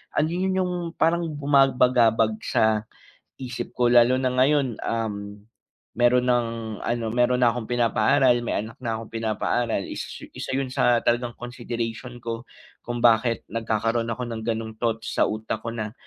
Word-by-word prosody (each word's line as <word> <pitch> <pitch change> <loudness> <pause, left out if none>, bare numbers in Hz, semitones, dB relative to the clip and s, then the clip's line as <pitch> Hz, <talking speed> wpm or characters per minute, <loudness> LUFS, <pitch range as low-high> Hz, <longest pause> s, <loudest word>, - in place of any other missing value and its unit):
ano 155 +1 +2
yun 185 +2 0
yung 180 -1 0 0.2
parang 170 +1 +1
bumabagabag 125 -6 +3
sa 110 0 +1 0.5
isip 125 -2 -6
ko, 120 -1 +2
lalo 120 +1 +6
na 130 -1 0
ngayon, 130 -2 +2
um, 105 -3 -4 0.6
meron 125 +1 +3
ng 120 -2 +2 0.4
ano, 120 -1 -1
meron 125 +1 +2
na 120 - +5
akong 120 -2 -4
pinapaaral 120 +2 +3
may 115 - -1
anak 115 +1 -11
na 115 -1 -2
akong 115 - -11
pinapaaral. 115 +1 -1
Is - - -5 0.3
isa - - -5
yun 135 -1 -1
sa 120 -2 +3
talagang 120 0 0
consideration 120 0 -5
ko 115 0 -5 0.4
kung 120 0 -4
bakit 115 0 +3
nagkakaroon 115 +1 -1
ako 125 +1 -4
ng 115 -1 -5
gano' 115 -1 -2
ng 110 - -22
thoughts 115 -1 -2
sa - - +4
utak 110 0 -4
ko 115 - -3
na, 110 -2 -4
120 Hz, 160 wpm, -24 LUFS, 115-125 Hz, 0.6 s, lalo